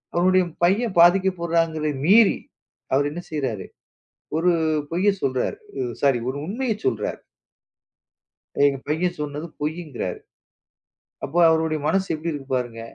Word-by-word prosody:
அவருடைய 185 +2 +4 0.2
பையன் 200 +2 +1
பாதிக்கப்படுறான் 170 -2 +3
என்கிறதை 155 -1 -2
மீறி 210 +4 +6 0.6
அவர் 145 +2 +2
என்ன 175 +3 -6
செய்றாரு? 130 -10 -3 0.7
ஒரு 180 +2 +3 0.4
பொய்யை 185 +5 +2
சொல்றாரு. 130 - -1 0.4
சாரி 135 -3 +4
ஒரு 130 - -3
உண்மையைச் 220 +1 -3
சொல்றாரு. 110 -5 -1 1.5
எங்க 140 -1 +2
பையன் 175 +3 0
சொன்னது 150 +3 -4
பொய்யிங்கிறாரு. 150 - -4 1.0
அப்போ, 165 +6 -3
அவருடைய 160 -1 +1
மனசு 195 0 +1
எப்படி 160 +2 -3
இருக்கு 135 -2 -7
பாருங்க. 120 -2 -3
160 Hz, 115 wpm, -23 LUFS, 140-185 Hz, 1.5 s, மீறி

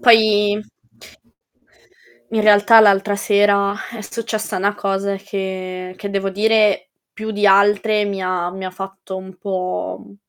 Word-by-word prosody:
Poi 215 -3 +4 1.7
in 225 - 0
realtà 210 +1 +6
l'altra 200 -1 +3
sera 200 -1 +2 0.2
è 230 - -8
successa 220 -1 -4
'na 200 +2 0
cosa 195 0 -2
che 185 -2 -6
che 200 - -6
devo 195 -1 -2
dire 215 0 +2 0.2
più 220 0 -6
di 205 -1 0
altre 205 +2 +3
mi 200 -1 -4
ha 180 -1 -2
mi 190 +1 -8
ha 185 - -4
fatto 195 0 -8
un 190 0 -10
po', 180 - -4
mhmm, - - -17
200 Hz, 140 wpm, -19 LUFS, 190-210 Hz, 1.7 s, realtà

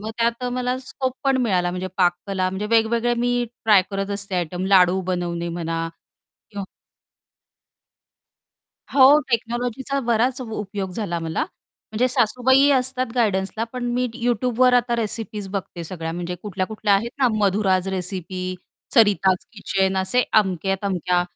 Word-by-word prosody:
मग 215 +1 -5
त्यात 235 +1 0
मला 250 0 -1
स्कोप 260 0 -4
पण 270 -1 +3
मिळाला 180 -6 +1
म्हणजे 180 +1 -4
पाककला 185 +1 +1
म्हणजे 190 +3 -3
वेगवेगळे 230 +1 +2
मी 245 0 +1 0.2
ट्राय 210 -4 +6
करत 195 0 -3
असते 200 -1 -3
आयटम 180 +1 -2
लाडू 190 -1 +5
बनवणे 170 -1 -2
म्हणा 165 -1 -3 0.6
किंवा 200 -1 -5 2.3
हो, 275 +2 +8
टेक्नॉलॉजीचा 245 +3 -1
बराच 240 +2 +1
उपयोग 205 -5 -5
झाला 180 -4 -3
मला. 165 - -2 0.5
म्हणजे 235 +4 +1
सासूबाई 255 +3 +3
असतात 255 -1 +1
गाईडन्सला 215 -2 0
पण 250 -1 -4
मी 250 0 +1
Youtubeवर 245 +1 +2
आता 240 -1 +2
रेसिपीज 215 -2 -4
बघते. 190 -3 -5
सगळ्या 165 -1 -5
म्हणजे 175 +1 -4
कुठल्या-कुठल्या 205 +1 0
आहेत 220 +4 0
ना 260 -2 +4
मधुराज 195 -2 +2
रेसिपी, 185 0 -4 0.4
सरिताज 200 -5 +4
किचन 195 -2 0
असे 190 +7 +2 0.2
अमक्या-तमक्या 190 -2 -1
205 Hz, 130 wpm, -22 LUFS, 185-240 Hz, 2.3 s, हो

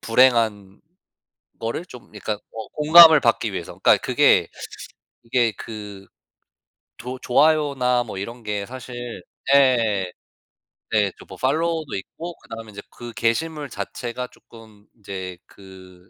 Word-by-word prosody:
불행한 115 -5 +2 0.8
거를 115 +9 -3
좀 125 -8 -14
약간 105 - -3 0.2
어 110 -2 -7
공감을 160 0 +8
받기 - - +1
위해서 - - -6
그러니까 - - +5
그게 - - +4 0.8
그게 115 -2 +1
그 105 -2 -9 0.9
조 125 +2 -6
좋아요나 135 -3 +2
뭐 110 -4 -8
이런 115 +4 -7
게 105 -1 -2
사실 130 0 -9 0.6
예. 115 -9 +3 0.8
예 105 -3 +3
또 - - -13
뭐 95 - -11
팔로워도 160 - -1
있고 165 - -7
그다음에 110 -1 -10
이제 100 0 -9
그 120 -1 -10
게시물 145 +5 -1
자체가 125 +1 -5
쪼끔 110 -4 -18
이제 95 -3 -7
그 95 -2 -16
115 Hz, 240 characters per minute, -22 LUFS, 100-130 Hz, 0.9 s, 공감을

